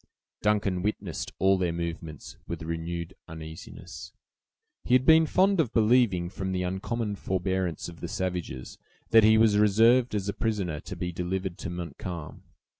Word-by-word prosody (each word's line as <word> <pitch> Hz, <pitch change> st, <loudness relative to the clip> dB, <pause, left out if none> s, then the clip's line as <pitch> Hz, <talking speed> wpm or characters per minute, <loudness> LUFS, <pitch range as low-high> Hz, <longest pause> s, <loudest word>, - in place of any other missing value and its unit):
Duncan 100 Hz, -3 st, +1 dB
witnessed 105 Hz, +3 st, -3 dB
all 95 Hz, +1 st, +3 dB
their 90 Hz, -2 st, +1 dB
movements 85 Hz, -3 st, -6 dB
with 85 Hz, 0 st, -5 dB
renewed 85 Hz, +2 st, -4 dB
uneasiness. 80 Hz, -1 st, -9 dB, 0.7 s
He 125 Hz, -, +3 dB
had 130 Hz, 0 st, +3 dB
been 160 Hz, 0 st, +6 dB
fond 195 Hz, +2 st, +3 dB
of 130 Hz, -8 st, +1 dB
believing, 110 Hz, -6 st, +3 dB
from 95 Hz, +1 st, -4 dB
the 90 Hz, 0 st, -1 dB
uncommon 105 Hz, +4 st, -2 dB
forbearance 95 Hz, -3 st, -2 dB
of 85 Hz, -2 st, -10 dB
the -, -, -4 dB
savages, 90 Hz, -8 st, -4 dB, 0.3 s
that 115 Hz, -1 st, +7 dB
he 110 Hz, +1 st, +6 dB
was 110 Hz, -2 st, +4 dB
reserved 115 Hz, +4 st, +4 dB
as 100 Hz, -1 st, -2 dB
a 100 Hz, -, -1 dB
prisoner 100 Hz, -9 st, -2 dB
to -, -, -8 dB
be 90 Hz, -, -3 dB
delivered 90 Hz, +1 st, -3 dB
to 100 Hz, -, -5 dB
Montcalm. 85 Hz, -2 st, -6 dB
95 Hz, 155 wpm, -27 LUFS, 85-110 Hz, 0.7 s, that